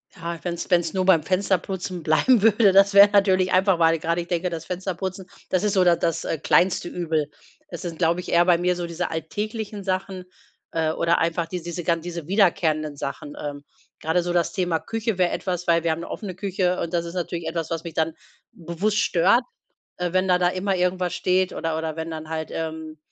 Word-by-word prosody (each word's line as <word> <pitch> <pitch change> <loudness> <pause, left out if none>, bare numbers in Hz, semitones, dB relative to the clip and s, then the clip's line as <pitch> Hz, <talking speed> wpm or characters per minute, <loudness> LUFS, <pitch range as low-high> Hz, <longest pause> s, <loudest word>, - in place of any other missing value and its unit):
Ja, 170 -1 -5
wenn's 175 -1 -4
wenn's 170 -2 +2
nur 185 -1 0
beim 185 -4 +5
Fensterputzen 185 0 -1
bleiben 195 +10 +3
würde, 210 -1 +5
das 195 +1 +5
wär 200 +1 +9
natürlich 190 -2 +3
einfach, 190 0 +3
weil 165 -1 +3
grade 170 +2 -1
ich 170 - -9
denke, 175 +1 -1
das 165 -2 -6
Fensterputzen, 185 +1 -5 0.2
das 185 0 +1
ist 210 -1 +1
so 190 -3 +4
da 175 -1 +5
das, 165 -1 -2
äh, 160 - -2
kleinste 175 +3 +2
Übel. 160 -4 -2 0.4
Es 290 - -8
sind, 170 -3 -6
glaube 170 0 +2
ich, 180 - -7
eher 175 0 +5
bei 175 -2 +4
mir 180 +1 +1
so 175 -1 -4
diese 170 0 -3
alltäglichen 210 +6 -4
Sachen, 185 -1 -3 0.5
äh, 160 -1 0
oder 170 +1 +1
einfach 165 +1 0
dies 175 +1 -5
diese 175 +1 -5
gan 170 0 0
diese 170 -2 -6
wiederkehrenden 160 -6 +1
Sachen. 140 +1 -6
Ähm. 145 -1 -6 0.4
Gerade 165 +3 +1
so 175 - -2
das 175 -1 0
Thema 175 -4 0
Küche 225 0 -3
wäre 180 -1 +3
etwas, 180 -2 -3
weil 170 -1 +3
wir 165 - +1
haben 160 - -2
'ne - - -8
offene 205 -5 -5
Küche 185 -1 -1
und 170 - -4
das 170 -1 0
ist 170 - -7
natürlich 170 -1 -3
etwas, 165 -1 -3
was 165 -1 -3
mich 170 -2 -7
dann 160 0 0 0.4
bewusst 180 +5 -2
stört, 200 +6 +3 0.5
äh, 180 -1 -2
wenn 185 0 +2
da 180 -1 +4
da 175 0 +2
immer 190 +2 -1
irgendwas 180 0 0
steht 185 0 +1
oder 165 -1 -2
oder 160 -1 -4
wenn 160 0 -5
dann 155 -1 -7
halt, 160 -1 -4
ähm 160 -1 -5
175 Hz, 215 wpm, -23 LUFS, 165-185 Hz, 0.5 s, wär